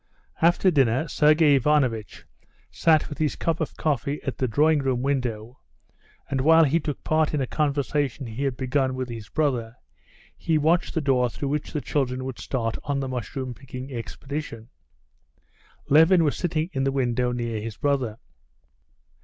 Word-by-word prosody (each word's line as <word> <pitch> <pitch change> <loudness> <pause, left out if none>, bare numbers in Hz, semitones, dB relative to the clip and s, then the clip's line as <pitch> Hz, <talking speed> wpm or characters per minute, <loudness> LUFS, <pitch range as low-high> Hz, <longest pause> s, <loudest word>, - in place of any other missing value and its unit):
After 175 +3 +4
dinner 135 0 +2
Sergey 150 +1 +4
Ivanovitch 130 -6 0 0.5
sat 160 -2 +3
with 145 - -8
his 155 -2 0
cup 165 -1 -1
of 160 - -4
coffee 145 -1 -1
at 135 - -4
the 130 - +1
drawing 150 +6 +3
room 130 -3 -1
window, 125 -4 -2 0.7
and 135 -2 -1
while 160 +3 +6
he 155 +3 +2
took 150 -2 -5
part 155 -1 +1
in - - 0
a 135 - 0
conversation 145 -1 -1
he 115 +3 -6
had 135 -3 -1
begun 130 0 0
with 130 -1 -4
his 115 -3 -8
brother, 125 -7 -1 0.6
he 160 -2 0
watched 160 +3 +1
the 160 - +1
door 130 -4 +2
through 140 +4 -4
which 150 +1 -2
the 150 - -2
children 130 -3 -2
would 130 -2 -6
start 115 -4 -2
on 140 -1 -1
the 135 - -3
mushroom 130 0 -4
picking 130 +1 -9
expedition. 120 0 -6 1.2
Levin 160 +4 +6
was 150 - +1
sitting 165 0 -2
in 135 -1 -1
the 135 - +1
window 125 -2 0
near 120 -3 -3
his 110 -2 -6
brother. 130 -6 -1
135 Hz, 165 wpm, -25 LUFS, 125-150 Hz, 1.2 s, while